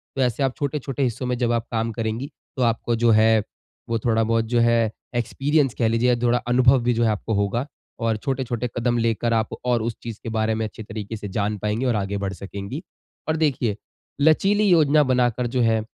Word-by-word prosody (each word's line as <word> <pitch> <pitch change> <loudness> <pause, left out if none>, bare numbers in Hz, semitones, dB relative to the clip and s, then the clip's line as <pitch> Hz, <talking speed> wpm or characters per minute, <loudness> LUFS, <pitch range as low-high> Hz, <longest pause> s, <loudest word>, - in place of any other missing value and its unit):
तो 135 - -1
ऐसे 125 +2 +1
आप 130 -1 0
छोटे-छोटे 140 -1 -2
हिस्सों 125 +1 -1
में 125 -1 -1
जब 120 -1 +1
आप 115 -1 0
काम 115 0 -1
करेंगी 115 +5 -3 0.3
तो 130 - +1
आपको 115 0 +1
जो 115 0 +3
है 110 -1 +4 0.5
वो 115 -1 0
थोड़ा-बहुत 115 0 +1
जो 120 +1 +1
है 115 -2 +3 0.2
एक्सपीरियंस 135 +3 +1
कह 115 - +3
लीजिए 115 +2 +2
या 125 - +4
थोड़ा 120 0 +3
अनुभव 125 +1 +5
भी 120 0 +2
जो 115 +1 +1
है 110 - +3
आपको 110 +2 -3
होगा, 100 +5 0 0.3
और 115 -2 0
छोटे-छोटे 125 -1 -2
कदम 120 0 +1
लेकर 115 0 0
आप 110 -1 +1 0.2
और 120 -2 +2
उस 115 -1 -2
चीज़ 115 -2 -6
के 115 - -4
बारे 110 0 +1
में 110 - -1
अच्छे 110 0 -8
तरीके 110 0 -6
से 105 - -6
जान 105 +2 -1
पाएँगी 105 +6 -2
और 120 -3 +2
आगे 100 0 -2
बढ़ 100 -1 -3
सकेंगी। 100 - -7 0.5
और 160 - +2
देखिए, 130 -9 +1 0.5
लचीली 195 +7 +4
योजना 155 -3 +5
बनाकर 125 -2 +1
जो 125 +1 0
है 110 -1 +3
115 Hz, 210 wpm, -23 LUFS, 110-125 Hz, 0.5 s, अनुभव